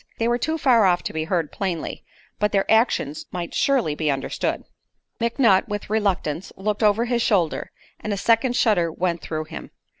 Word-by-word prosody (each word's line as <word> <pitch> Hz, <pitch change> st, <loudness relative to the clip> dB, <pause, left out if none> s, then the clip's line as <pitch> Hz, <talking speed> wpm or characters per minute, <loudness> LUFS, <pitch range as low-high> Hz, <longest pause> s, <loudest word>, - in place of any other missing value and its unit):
They 230 Hz, -, 0 dB
were 240 Hz, +1 st, +1 dB
too 315 Hz, +6 st, -1 dB
far 245 Hz, -8 st, +4 dB
off 175 Hz, -2 st, +2 dB
to -, -, -4 dB
be 160 Hz, 0 st, -2 dB
heard 165 Hz, -3 st, -1 dB
plainly, 180 Hz, -5 st, -4 dB, 0.4 s
but 210 Hz, 0 st, +1 dB
their 195 Hz, -1 st, +2 dB
actions 220 Hz, -, +1 dB
might 175 Hz, -2 st, -5 dB
surely 260 Hz, -, +1 dB
be 155 Hz, 0 st, -1 dB
understood. 135 Hz, -1 st, -2 dB, 0.6 s
McNutt 230 Hz, -4 st, +3 dB
with 205 Hz, -1 st, -5 dB
reluctance 190 Hz, -6 st, -1 dB
looked 210 Hz, +2 st, -2 dB
over 215 Hz, +2 st, +3 dB
his 240 Hz, -1 st, 0 dB
shoulder, 180 Hz, -8 st, +1 dB, 0.3 s
and 215 Hz, -, -4 dB
a 200 Hz, -, -1 dB
second 230 Hz, +4 st, +2 dB
shudder 180 Hz, -9 st, +2 dB
went 170 Hz, 0 st, -2 dB
through 155 Hz, -1 st, -4 dB
him. 155 Hz, -, -9 dB
200 Hz, 180 wpm, -23 LUFS, 170-230 Hz, 0.6 s, far